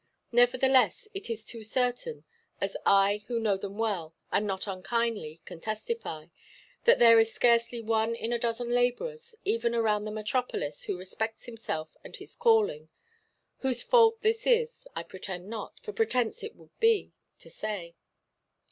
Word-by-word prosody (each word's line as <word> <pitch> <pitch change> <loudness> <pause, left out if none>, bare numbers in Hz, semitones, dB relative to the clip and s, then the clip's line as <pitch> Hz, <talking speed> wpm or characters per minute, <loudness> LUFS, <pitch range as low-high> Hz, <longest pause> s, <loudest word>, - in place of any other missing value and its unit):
Nevertheless, 255 - +4
it 390 -7 -6
is 225 -1 -4
too 230 -1 -6
certain—as 450 - -3
I, 200 +1 +4
who 235 -2 -1
know 215 -3 +2
them 195 +1 -7
well, 190 -8 -2 0.2
and 210 - +1
not 190 -1 -2
unkindly, 195 -4 -2
can 165 - -10
testify—that 215 - -2
there 230 -1 +8
is 225 0 +3
scarcely 235 0 +2
one 225 +1 +1
in 230 +1 -3
a 235 - 0
dozen 235 +1 -1
labourers, 460 - -1
even 400 - +1
around 215 -2 +1
the 215 - -4
metropolis, 215 - -2
who - - -2
respects 220 +5 -4
himself 215 -10 -5
and - - -9
his - - -12
calling. 455 +1 +2 0.7
Whose 255 -2 -1
fault 455 -2 +5
this 450 0 +1
is, 475 0 +1
I - - -3
pretend 190 0 -7
not—for 230 - -7
pretence 435 - 0
it 440 +1 -7
would - - -20
be—to 450 -2 0
say. 200 -6 -5
230 Hz, 145 wpm, -29 LUFS, -, 0.7 s, there